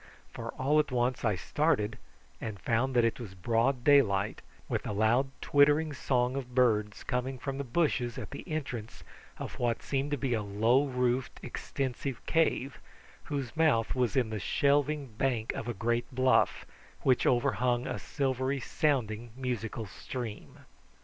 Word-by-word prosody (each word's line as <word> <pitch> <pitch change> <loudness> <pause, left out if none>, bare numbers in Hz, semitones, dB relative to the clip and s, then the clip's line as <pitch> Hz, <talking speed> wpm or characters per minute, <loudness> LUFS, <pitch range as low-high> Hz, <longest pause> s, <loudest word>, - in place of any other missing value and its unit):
For 115 0 -6
all 145 +4 +2
at 150 - +1
once 125 0 0
I 105 -4 +2
started 125 - 0 0.4
and 110 -3 -5
found 125 +6 0
that 120 -1 +5
it 115 - 0
was 105 -6 -8
broad 120 +6 +1
daylight, 110 -9 +4 0.3
with - - -1
the - - -4
loud 115 +6 +3
twittering 145 +2 +4
song 125 -2 0
of 125 -3 -5
birds 105 -5 +2
coming 130 +1 -2
from 135 +2 -4
the - - -1
bushes 125 -3 0
at 115 -5 -6
the - - -7
entrance 125 -8 -4 0.3
of - - -7
what 120 -2 0
seemed 140 +1 -1
to 145 - 0
be 125 -1 -1
a 110 - 0
low 110 +7 +2
roofed 125 0 0
extensive 130 -2 -4
cave, 140 -5 +1 0.5
whose 140 -5 -4
mouth 155 -9 +3
was 125 -5 0
in 120 -4 +2
the 110 - -2
shelving 145 - +2
bank 115 -1 -1
of 115 - -5
a 120 - -1
great 120 +4 0
bluff 130 0 +2 0.4
which 130 -2 +3
overhung 120 0 +2
a - - -3
silvery 135 -1 -1
sounding 120 -5 0
musical 120 -3 -3
stream. 110 +3 -7
125 Hz, 155 wpm, -30 LUFS, 115-135 Hz, 0.5 s, that